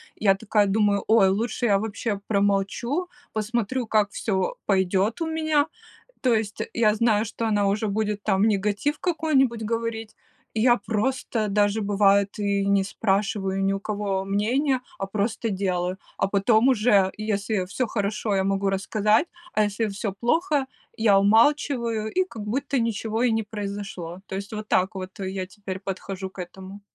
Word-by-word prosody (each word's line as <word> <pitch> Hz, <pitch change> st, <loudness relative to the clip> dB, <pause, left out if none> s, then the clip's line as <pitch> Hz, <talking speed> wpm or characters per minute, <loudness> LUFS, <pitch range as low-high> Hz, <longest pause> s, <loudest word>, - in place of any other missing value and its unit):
Я 195 Hz, -2 st, +3 dB
такая 210 Hz, +1 st, +1 dB
думаю, 200 Hz, 0 st, +2 dB
ой, 215 Hz, -3 st, +5 dB
лучше 220 Hz, +5 st, -1 dB
я 200 Hz, -2 st, +4 dB
вообще 215 Hz, 0 st, -3 dB
промолчу, 205 Hz, -, 0 dB, 0.2 s
посмотрю, 235 Hz, +3 st, -1 dB
как 210 Hz, -2 st, +2 dB
всё 190 Hz, -4 st, -1 dB
пойдет 195 Hz, -, +1 dB
у 330 Hz, -, 0 dB
меня. 315 Hz, -2 st, +1 dB, 0.5 s
То 250 Hz, -4 st, +3 dB
есть, 215 Hz, -1 st, -2 dB
я 215 Hz, -2 st, +3 dB
знаю, 220 Hz, -1 st, +2 dB
что 225 Hz, +1 st, -4 dB
она 205 Hz, -2 st, +2 dB
уже 210 Hz, +2 st, 0 dB
будет, 210 Hz, 0 st, -1 dB
там, 195 Hz, -2 st, +1 dB
негатив 210 Hz, +7 st, 0 dB
какой-нибудь 285 Hz, -9 st, +1 dB
говорить. 225 Hz, 0 st, -3 dB, 0.4 s
Я 240 Hz, +2 st, +4 dB
просто 225 Hz, +1 st, -1 dB
даже 205 Hz, +1 st, +2 dB
бывает 200 Hz, 0 st, +3 dB
и 200 Hz, -1 st, 0 dB
не 200 Hz, 0 st, +3 dB
спрашиваю 195 Hz, -1 st, -1 dB
ни 195 Hz, 0 st, +2 dB
у 195 Hz, -, -3 dB
кого 200 Hz, -2 st, -2 dB
мнение, 250 Hz, +7 st, +1 dB, 0.2 s
а -, -, -2 dB
просто 220 Hz, +3 st, -2 dB
делаю. 185 Hz, -2 st, -1 dB, 0.2 s
А -, -, 0 dB
потом 220 Hz, +5 st, +3 dB
уже, 210 Hz, -6 st, +3 dB
если 210 Hz, -2 st, -1 dB
всё 240 Hz, +6 st, -2 dB
хорошо, 210 Hz, 0 st, -1 dB
я 190 Hz, -, +2 dB
могу 195 Hz, 0 st, +1 dB
рассказать, 210 Hz, -, +2 dB, 0.3 s
а 215 Hz, -, +3 dB
если 210 Hz, +2 st, -1 dB
всё 200 Hz, 0 st, -3 dB
плохо, 295 Hz, +2 st, +1 dB, 0.3 s
я 215 Hz, -4 st, +4 dB
умалчиваю, 230 Hz, 0 st, +2 dB
и 370 Hz, +7 st, +1 dB
как 230 Hz, -, -9 dB
будто 270 Hz, +6 st, -1 dB
ничего 225 Hz, 0 st, -1 dB
и 250 Hz, -, +3 dB
не 225 Hz, 0 st, +1 dB
произошло. 200 Hz, -4 st, -6 dB
То -, -, -7 dB
есть, 200 Hz, +2 st, -6 dB
вот 215 Hz, 0 st, -5 dB
так 185 Hz, +3 st, +2 dB
вот 190 Hz, +1 st, -7 dB
я 190 Hz, -1 st, -3 dB
теперь 190 Hz, -1 st, -7 dB
подхожу 190 Hz, 0 st, -5 dB
к -, -, -21 dB
этому. 190 Hz, +3 st, -9 dB
210 Hz, 160 wpm, -25 LUFS, 195-230 Hz, 0.5 s, ой